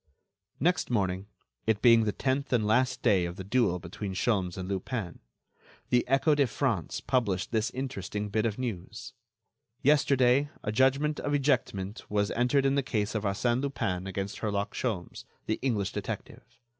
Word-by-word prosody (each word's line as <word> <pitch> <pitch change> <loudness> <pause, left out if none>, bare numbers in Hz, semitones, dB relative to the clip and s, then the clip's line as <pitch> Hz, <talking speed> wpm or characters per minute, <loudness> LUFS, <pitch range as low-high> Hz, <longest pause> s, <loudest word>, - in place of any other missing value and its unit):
Next 180 +4 +1
morning—it 100 - -2
being 115 -2 +6
the 105 - +1
tenth 135 +4 -1
and 115 -4 +2
last 125 +4 +2
day 100 -7 +4
of 85 0 -5
the 95 - -6
duel 100 -3 +2
between 95 +2 -6
Sholmes 95 -5 0
and 95 -1 -4
Lupin—the 95 - -4
Echo 135 +4 +3
de 145 -2 +3
France 115 - -1
published 115 -8 0
this 110 -1 +1
interesting 105 -6 -4
bit 110 +2 +1
of 105 - -3
news: 115 -9 -5 0.7
"Yesterday 140 -1 +4
a 105 - -1
judgment 135 +6 +2
of 145 0 0
ejectment 120 -8 0
was 105 0 +1
entered 125 +3 +2
in 135 - +3
the 140 - +2
case 105 -5 -1
of 110 -1 -2
Arsène 120 +5 +1
Lupin 95 -10 -2
against 95 +1 -4
Herlock 100 -1 -1
Sholmes, 105 -9 -3 0.2
the 110 - -1
English 110 -7 0
detective. - - -5
110 Hz, 155 wpm, -29 LUFS, 100-130 Hz, 0.7 s, being